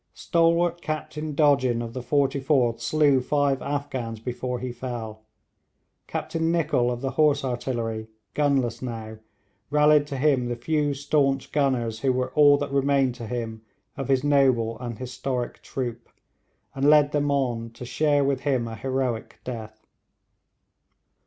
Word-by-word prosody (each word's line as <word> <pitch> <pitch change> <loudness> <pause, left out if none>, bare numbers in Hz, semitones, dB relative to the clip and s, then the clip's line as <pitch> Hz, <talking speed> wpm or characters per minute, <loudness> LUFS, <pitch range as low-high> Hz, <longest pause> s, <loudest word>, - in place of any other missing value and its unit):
Stalwart 170 +1 +2
Captain 155 -1 -4
Dodgin 140 -5 +3
of 115 -1 -5
the 130 - -4
44th 135 -2 +1
slew 145 -4 +3
five 140 0 +1
Afghans 135 -6 -3
before 125 +2 -4
he 125 +1 -4
fell. 115 -3 -6 0.9
Captain 165 0 -2
Nicholl 150 -7 +1
of 120 0 -3
the 135 -1 -2
horse 145 -2 +2
artillery, 115 -3 -3 0.3
gunless 135 -5 +1
now, 110 -3 -6 0.5
rallied 150 0 +4
to 140 -2 -4
him 130 -3 +2
the 120 - -2
few 145 +3 0
staunch 140 -1 0
gunners 125 -6 0
who 130 +2 +2
were 125 0 -1
all 145 -1 +6
that 145 -1 -4
remained 140 -2 +2
to 120 -2 -8
him 115 -2 -4 0.3
of 135 -3 -4
his 135 -1 +2
noble 130 -6 +2
and 120 -3 -5
historic 125 0 -4
troop, 120 -3 -5 0.6
and 135 +2 +2
led 150 -1 +5
them 145 -1 0
on 125 -5 0
to 115 +2 -10
share 145 +3 +2
with 135 -1 +1
him 130 -4 0
a 115 - -6
heroic 130 -2 -2
death. 110 -3 -8
135 Hz, 145 wpm, -25 LUFS, 120-145 Hz, 0.9 s, all